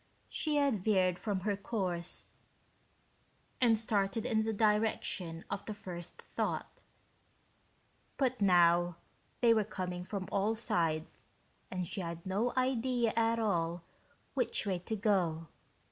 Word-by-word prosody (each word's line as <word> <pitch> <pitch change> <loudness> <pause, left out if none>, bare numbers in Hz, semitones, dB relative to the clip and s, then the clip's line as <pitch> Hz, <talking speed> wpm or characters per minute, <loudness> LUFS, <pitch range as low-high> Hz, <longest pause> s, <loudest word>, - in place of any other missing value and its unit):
She 305 -1 -1
had 280 -7 +3
veered 185 -4 +3
from 205 -4 -1
her 205 +1 0
course 185 -5 -3 1.4
and 230 -3 +5
started 215 -1 0
in 220 - +2
the 220 0 0
direction 210 -6 0
of 200 - -4
the 215 - -4
first 175 -4 -8
thought, - - -3 1.4
but 255 -4 0
now 175 -2 +5 0.5
they 235 -2 +6
were 220 -1 +3
coming 180 -3 -4
from 190 0 -4
all 205 +3 +1
sides 165 -7 -1 0.4
and 185 -1 -2
she 195 +3 -4
had 170 -1 -5
no 205 +6 0
idea 255 -2 +1
at 230 0 +3
all 175 -6 0 0.5
which - - +1
way 190 -3 0
to 220 +5 -3
go. 180 -7 +1
200 Hz, 130 wpm, -33 LUFS, 175-225 Hz, 1.4 s, they